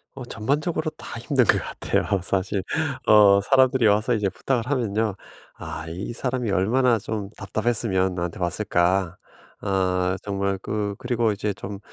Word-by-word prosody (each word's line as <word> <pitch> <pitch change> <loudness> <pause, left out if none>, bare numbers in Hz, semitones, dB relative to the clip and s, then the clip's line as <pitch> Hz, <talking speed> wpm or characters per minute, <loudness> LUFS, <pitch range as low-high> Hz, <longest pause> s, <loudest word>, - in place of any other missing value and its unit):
어 130 -2 -7
전반적으로 150 +8 -1
다 115 - -9
힘든 125 +1 +2
것 - - +4
같아요 100 -2 -1
사실. 95 +1 -1 0.4
어 100 -2 +7
사람들이 130 +2 +3
와서 105 +4 +3
이제 105 -3 0
부탁을 120 +5 -2
하면요. 110 -5 0 0.4
'아. 80 - -6
이 90 +7 -5
사람이 125 -1 -2
얼마나 115 +6 +3
좀 105 -1 -4
답답했으면 100 -2 0
나한테 85 0 -4
왔을까?' 90 -1 0 0.4
아 95 -2 0
정말 100 -1 -1
그 105 -1 -2
그리고 120 -2 +1
이제 105 0 -2
좀 100 0 -7
105 Hz, 300 characters per minute, -24 LUFS, 95-120 Hz, 0.4 s, 어